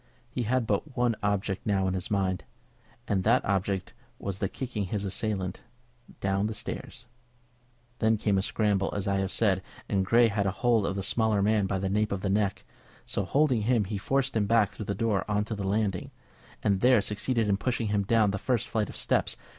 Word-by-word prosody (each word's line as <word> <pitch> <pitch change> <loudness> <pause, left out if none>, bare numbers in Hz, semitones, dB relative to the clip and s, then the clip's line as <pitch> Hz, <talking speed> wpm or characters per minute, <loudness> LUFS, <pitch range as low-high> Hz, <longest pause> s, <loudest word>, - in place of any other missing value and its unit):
He 125 - -2
had 120 +1 +1
but 125 +7 -2
one 120 -2 +2
object 100 -1 -1
now 95 -2 +1
in 95 - 0
his 95 -1 -3
mind, 95 -3 0 0.6
and 95 -2 +1
that 115 +5 +3
object 95 -1 -1 0.2
was 95 -1 -4
the 95 - -1
kicking 120 -6 -4
his 100 +2 -3
assailant 95 -2 -2 0.6
down 100 +1 0
the 110 - -4
stairs. 120 +1 -7 0.9
Then 110 -1 +3
came 100 -2 +1
a - - +1
scramble, 100 -1 +1
as 100 0 -2
I 100 0 +1
have 95 0 -1
said, 95 -5 +2 0.3
and 95 -1 +1
Grey 115 +5 +5
had 100 -1 0
a 95 - -2
hold 115 -4 +4
of 95 - -2
the 100 - -2
smaller 110 -2 +2
man 105 -1 +2
by 95 - -1
the 95 +1 -2
nape 105 +2 +1
of 100 -1 -3
his 100 - 0
neck. 100 -1 0 0.4
So 100 - -2
holding 135 0 +2
him 115 0 +2
he 100 +1 -4
forced 135 +4 0
him 105 -2 +2
back 110 -3 +3
through 105 - -7
the 100 - -2
door 105 -2 +1
on 105 0 +1
to 110 - -4
the 100 -2 -3
landing, 100 -2 0 0.5
and 100 -2 +2
there 125 -3 +5
succeeded 110 +3 0
in 100 -1 +2
pushing 115 0 -1
him 105 -1 +1
down 105 0 +3
the 100 - -3
first 125 -1 0
flight 110 -2 -1
of - - -8
steps. - - 0
105 Hz, 210 wpm, -28 LUFS, 95-110 Hz, 0.9 s, Grey